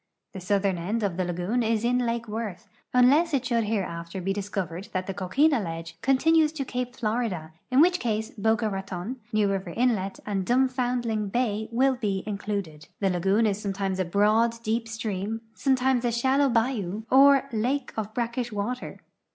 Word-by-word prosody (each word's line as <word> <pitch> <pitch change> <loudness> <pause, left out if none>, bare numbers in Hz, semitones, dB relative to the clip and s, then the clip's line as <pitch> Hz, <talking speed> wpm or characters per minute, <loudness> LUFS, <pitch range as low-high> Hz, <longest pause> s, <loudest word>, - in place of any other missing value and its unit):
The 190 - -6
southern 195 -1 0
end 210 +6 -2
of 195 -4 0
the 185 - 0
lagoon 180 +7 -1
is 225 -1 +1
in 250 +1 +2
lake 230 0 -2
Worth, 210 -4 -5 0.2
unless 285 +6 +4
it 260 -2 -1
should 235 -3 +1
liereafter 185 -4 -3
he 195 - +1
dis 200 0 -5
covered 180 -2 -4
that 185 0 -1
the 195 - -4
coquina 270 - +2
ledge 165 -3 -5
continues 310 +4 +4
to 280 -4 -3
ca[>e 250 -1 -3
Florida, 215 -8 -2 0.2
in 255 +3 +5
which 355 +2 +4
case 220 -1 -2
Boca 225 -1 +1
Raton, 195 +3 -4
New 215 -2 +2
River 195 -2 -2
inlet, 220 -6 +1
and 200 -2 -1
r)uml)foundling 245 -3 0
hay 220 -3 0
will 260 +2 +2
he 195 -3 -1
included. 200 -7 -4
The 195 -2 +1
lagoon 195 +5 +2
is 205 -1 0
sometimes 195 -2 -2
a 185 - +1
broad, 215 +5 +3
deoj) 230 0 -2
stream, 225 -1 -3
sometimes 260 0 +1
a 240 - +1
shallow 265 +4 +2
bayou 225 -4 0
or 275 +1 +6
lake 250 +5 -1
of 215 -1 -3
brackish 240 0 -2
water. 215 +5 -4
220 Hz, 175 wpm, -26 LUFS, 195-250 Hz, 0.2 s, or